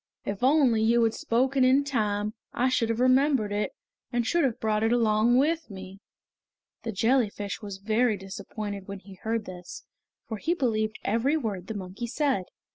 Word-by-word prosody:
If 200 +1 -4
only 260 -5 +4
you 230 +1 +4
had 225 -1 +2
spoken 260 +3 +1
in 260 +2 +5
time 210 -6 -1 0.2
I 255 +2 +2
should 230 -3 +1
have 230 0 -1
remembered 255 -3 +3
it, 205 +1 -1 0.4
and 240 -1 0
should 340 +6 +2
have 255 -5 0
brought 215 -1 0
it 225 +1 +2
along 230 0 +3
with 315 +3 +1
me!" 190 -1 -9 0.8
The 225 - -4
jellyfish 215 -2 0
was 200 -2 -6
very 215 +2 +1
disappointed 200 +1 -6
when 200 0 -6
he 195 0 -13
heard 225 -1 -1
this, 180 -1 -9 0.4
for 220 - -4
he 335 - 0
believed 220 -7 0
every 235 +9 +1
word 200 - -4
the 220 - -5
monkey 195 +4 -5
said. 265 -6 0
225 Hz, 175 wpm, -27 LUFS, 205-255 Hz, 0.8 s, in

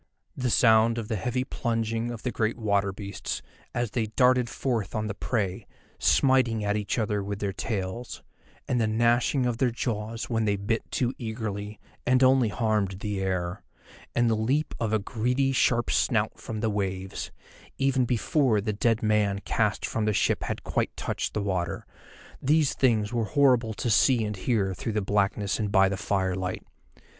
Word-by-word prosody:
The 125 -2 -1
sound 115 0 +4
of 115 -2 -4
the 110 - 0
heavy 125 +5 -1
plunging 115 -2 -2
of 120 -2 -7
the 125 - -1
great 110 0 -1
water 100 -3 +1
beasts, 100 +1 -5 0.3
as 120 -3 -2
they 115 -3 -1
darted 125 +2 +3
forth 115 -8 -2
on 110 0 -1
the 105 - -3
prey, 100 -2 -2 0.3
smiting 125 -5 +3
at 105 0 +1
each 105 +1 -2
other 105 -3 0
with 100 0 -4
their 100 -1 -2
tails, 105 +4 -4 0.4
and 125 -2 +1
the 110 - +2
gnashing 120 +4 +2
of 120 -1 -1
their 130 - +3
jaws 115 -1 -3
when 115 -2 0
they 100 -1 +2
bit 105 +3 -2
too 125 0 0
eagerly, 110 -3 -5 0.2
and 130 +1 +3
only 130 -3 +5
harmed 105 -3 -1
the 105 -2 -2
air, 90 0 -2 0.5
and 120 0 +3
the 115 - +3
leap 130 +8 0
of 115 -2 -1
a 110 - +3
greedy 125 +6 0
sharp 120 -2 +2
snout - - +1
from 110 -2 -5
the 110 -1 +1
waves, 95 -2 -3 0.5
even 135 -1 +2
before 120 0 +2
the 105 +1 -2
dead 115 +2 +1
man 105 -2 +2
cast 105 -2 0
from 110 - -1
the 105 - +1
ship - - +1
had - - -4
quite - - -2
touched - - -3
the 105 - 0
water—these 100 - -2
things 110 -4 +1
were 115 -2 0
horrible 125 -5 +3
to 120 +2 -1
see 120 +3 +4
and 105 0 -3
hear 95 -2 0
through 110 +5 -4
the 105 - +1
blackness 100 0 0
and 105 -2 -1
by 95 0 +5
the 100 - -1
firelight. 95 -2 -2
110 Hz, 175 wpm, -27 LUFS, 100-120 Hz, 0.5 s, only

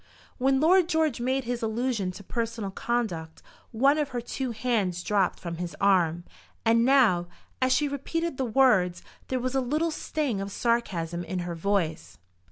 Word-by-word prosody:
When 265 +1 +3
Lord 345 +3 +4
George 315 -7 +1
made 260 +2 0
his 245 0 -3
allusion 225 -3 -1
to 200 - -10
personal 230 -1 -3
conduct 190 -9 -3 0.3
one 275 +6 +3
of 295 -2 -1
her 250 -2 -3
two 255 +2 -4
hands 215 -7 -1
dropped 200 -3 +1
from 170 -2 -5
his 170 -2 -5
arm, 175 -4 +3 0.4
and 230 +1 +4
now, 235 -10 +4 0.3
as 255 0 +3
she 295 +3 +3
repeated 305 +3 -3
the 265 - 0
words, 215 -8 +3 0.2
there 260 - -1
was 255 +1 -2
a 270 - +2
little 305 +6 0
sting 290 -9 -2
of 195 0 -5
sarcasm 180 -8 -1
in 185 - -4
her 175 - -4
voice. 165 - -2
235 Hz, 170 wpm, -27 LUFS, 185-265 Hz, 0.4 s, Lord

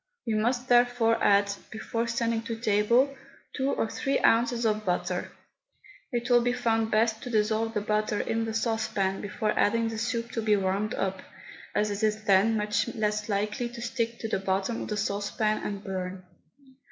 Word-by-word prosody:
We 225 - -1
must 240 +4 0
therefore 245 -2 +3
add, 200 0 +4 0.2
before 230 +1 -3
sending 230 -1 0
to 230 - -3
table, 230 +5 +2 0.4
two 265 0 0
or 225 - 0
three 270 +4 -1
ounces 235 +1 +3
of 215 -1 +1
butter. 180 -1 -2 0.8
It 240 -1 -2
will 245 -1 +5
be 245 +1 +1
found 225 -2 +1
best 220 0 +2
to 250 - -6
dissolve 220 0 +1
the 210 - +1
butter 210 0 0
in 225 0 -1
the 225 - -4
saucepan 220 -4 0
before 215 +1 -2
adding 230 +2 +2
the 225 -1 -4
soup 235 0 -2
to 225 - -2
be 215 -1 +3
warmed 195 +2 -1
up, 190 -1 -2 0.5
as 210 0 +1
it 200 +1 -3
is 215 0 +1
then 205 +2 +4
much 210 +1 0
less 210 -1 -1
likely 210 +4 -1
to 240 0 -9
stick 230 -2 -2
to 225 - -2
the 215 - -1
bottom 195 +4 -1
of - - -5
the 210 - -3
saucepan 210 +1 -1
and 200 -1 -4
burn. 185 -1 -5
220 Hz, 180 wpm, -28 LUFS, 210-230 Hz, 0.8 s, will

